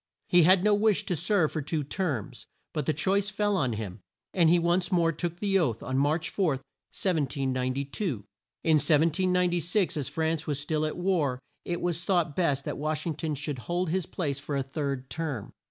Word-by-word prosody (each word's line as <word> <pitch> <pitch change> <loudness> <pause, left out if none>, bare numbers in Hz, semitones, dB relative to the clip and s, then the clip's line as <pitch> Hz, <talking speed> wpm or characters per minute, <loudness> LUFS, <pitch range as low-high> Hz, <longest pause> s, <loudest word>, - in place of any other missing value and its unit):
He 175 - +6
had 180 +3 +6
no 210 0 +4
wish 205 0 +3
to 180 - -1
serve 170 0 +2
for 155 - -2
two 150 +1 -2
terms, 145 - -3 0.3
but 150 - -2
the - - +4
choice 195 +6 +1
fell 205 0 0
on 130 -10 +1
him, 105 -3 -5 0.3
and 170 -4 +4
he 175 - +6
once 175 +2 +1
more 170 -2 +3
took 170 +1 -3
the 195 0 +2
oath, 120 - 0
on 130 +1 -1
March 155 +4 +1
4, 195 -3 +1
1792. 135 - -2 0.4
In 160 -1 +5
1796, 175 +3 +2
as 145 - -2
France 160 0 -1
was 145 -2 -1
still 155 +1 0
at 155 - -5
war, 175 -8 +1 0.3
it 175 -1 -2
was 175 -1 -1
thought 175 -5 +1
best 145 -6 +1
that - - -4
Wash 155 0 -1
ing 165 - 0
ton 155 0 -3
should 145 -1 -4
hold 175 -1 0
his 185 -1 0
place 140 -6 -2
for 140 +1 -4
a 135 - 0
third 135 -1 -3
term. 155 -9 -4
160 Hz, 190 wpm, -28 LUFS, 140-180 Hz, 0.4 s, He